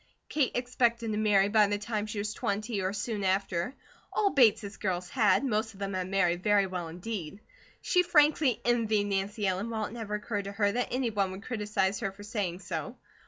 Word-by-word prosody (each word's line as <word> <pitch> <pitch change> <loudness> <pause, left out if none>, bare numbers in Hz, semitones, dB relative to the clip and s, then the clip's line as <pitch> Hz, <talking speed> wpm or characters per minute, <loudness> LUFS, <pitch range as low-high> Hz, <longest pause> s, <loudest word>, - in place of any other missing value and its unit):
Kate 290 -5 +1
expected 240 -2 0
to 210 - -1
marry 205 -2 +4
by 210 0 +4
the 205 0 0
time 210 0 -3
she 215 - -6
was 210 +1 -2
twenty 210 0 -2
or 185 0 0
soon 210 0 -3
after; 190 +3 0 0.4
all 405 -2 +2
Bates 220 -6 +3
girls 180 -2 -2
had, 230 +3 +3
most 220 -2 0
of - - -15
them 200 -1 -3
had 185 0 -2
married 180 -3 +1
very 205 0 +3
well 180 -3 -4
indeed. 180 +1 -6 0.4
She 360 - +4
frankly 300 -7 +3
envied 225 -3 +2
Nancy 200 +2 -1
Ellen, 190 +4 -1
while 220 -2 -2
it 215 - -8
never 220 -3 -4
occurred 210 -1 -3
to 200 - -5
her 205 0 +2
that 245 +4 -1
any 250 -1 -1
one 200 -2 0
would 190 +2 -8
criticise 205 -4 -1
her 195 -4 -2
for 200 +2 -13
saying 200 -5 -3
so. 165 - -5
210 Hz, 205 wpm, -29 LUFS, 195-230 Hz, 0.4 s, marry